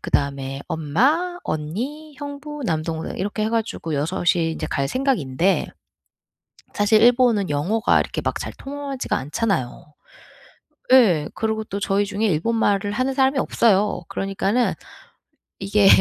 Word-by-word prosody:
그다음에 140 -1 -1
엄마, 270 - +1
언니, 250 - -4
형부, 290 0 -7
남동생 160 -2 -2
이렇게 205 +3 -2
해 220 - -1
가지고 220 -9 -2
6 165 +6 -2
이 165 -2 0
인제 - - -4
갈 140 -1 -1
생각인데 195 - +1 1.1
사실 215 +1 +3
일본은 235 -6 +4
영어가 180 +11 +2
이렇게 - - -3
막 - - -2
잘 - - -5
통하지가 275 -1 -4
않잖아요. 150 - -2 1.0
예. 185 -13 +5
그러고 220 0 -1
또 200 - -4
저희 200 +1 +1
중에 205 +2 -2
일본 195 +7 0
말을 205 -2 +1
하는 255 +4 0
사람이 265 0 +2
없어요. 210 -5 +2
그러니까는 195 +5 0 0.9
이게 195 0 +3
205 Hz, 290 characters per minute, -22 LUFS, 160-250 Hz, 1.1 s, 예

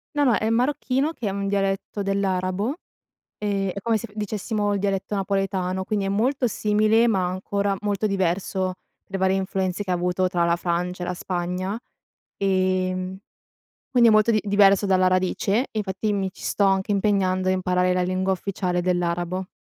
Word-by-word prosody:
No, 290 - +3
no 250 - +4
è 220 - 0
marocchino, 265 +4 +1
che 225 - -4
è - - +1
un 200 0 -3
dialetto 195 +1 -1
dell'arabo, 195 +4 -1 0.6
ehm, 200 -2 -1
è 200 - -4
come 230 0 +1
se 235 +2 -6
dicessimo 210 0 -2
il 200 - 0
dialetto 195 +1 -1
napoletano, 190 -1 -1
quindi 200 0 -1
è - - -1
molto 245 +6 +1
simile, 215 +2 +2
ma 190 -5 +2
ancora 200 +2 -1
molto 205 0 -1
diverso 185 0 -1 0.3
per - - -30
le - - 0
varie 190 0 +2
influenze 190 0 -2
che 185 - -3
avuto 180 +1 +1
tra 175 -2 0
la 170 0 +3
Francia 180 +1 -2
e - - -3
la 180 - -1
Spagna, 180 +4 -3 0.6
ehm, 185 -1 0 0.7
quindi 245 -3 +5
è - - +5
molto 215 +2 +4
di 215 -2 +3
diverso 200 0 +4
dalla 185 -1 +3
radice, 185 +4 +1
e - - -13
infatti 205 +1 -2
mi 195 -2 -1
ci - - -14
sto 200 - +1
anche 195 +1 +2
impegnando 190 -2 +1
a - - +3
imparare 180 0 +1
la 180 - +1
lingua 185 +1 0
ufficiale 180 -1 -2
dell'arabo. 175 +1 -1
195 Hz, 180 wpm, -24 LUFS, 185-205 Hz, 0.7 s, quindi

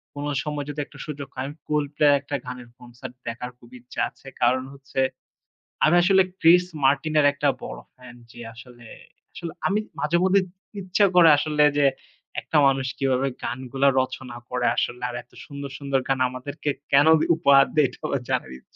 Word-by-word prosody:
কোনো 145 +1 -4
সময় 150 -2 -4
যদি 145 0 -6
একটা 145 0 -16
সুযোগ 145 -2 -6
হয়, 130 +2 -4 0.2
Coldplay 150 0 +1
এর - - +5
একটা 145 +1 -5
গানের 125 -1 -8
concert 120 0 -11
দেখার 125 +2 -5
খুব 120 - -18
ইচ্ছা 120 +1 -6
আছে। - - -20
কারণ 130 +2 +3
হচ্ছে 135 -1 -7 0.9
আমি 155 - +4
আসলে 190 +1 +5 0.2
Chris 175 +2 +6 0.2
Martin 145 +3 +2
এর 145 - +4
একটা 145 0 +1
বড় - - -7 0.2
fan 125 -1 -14 0.2
যে 120 - -14
আসলে, 120 0 -14 0.5
আসলে 170 -2 -6 0.2
আমি 205 +2 +1 0.2
মাঝে 165 +3 +1
মধ্যে 190 +1 +4
ত - - -18 0.3
ইচ্ছা 185 +2 +2
করে 170 -2 +8
আসলে 150 0 +1 0.2
যে, 145 - +4 0.6
একটা 160 - -1
মানুষ 135 -1 +1
কিভাবে 135 -1 +1 0.2
গানগুলা 130 +2 -1
রচনা 130 -1 -6
করে 125 -1 0
আসলে 125 - -1
আর 120 - -6
এত 120 - -41
সুন্দর, 140 -1 -7
সুন্দর 140 -2 0
গান 135 -1 0
আমাদেরকে 135 +4 -5 0.2
কেনো 145 +3 +6
দে - - +1
উপহার 140 -4 +5
দেয়, 150 -3 +4
এটাও - - -10
আমার 140 - -1
জানার 65 - -1
ইচ্ছা - - -34
140 Hz, 180 wpm, -24 LUFS, 125-150 Hz, 0.9 s, করে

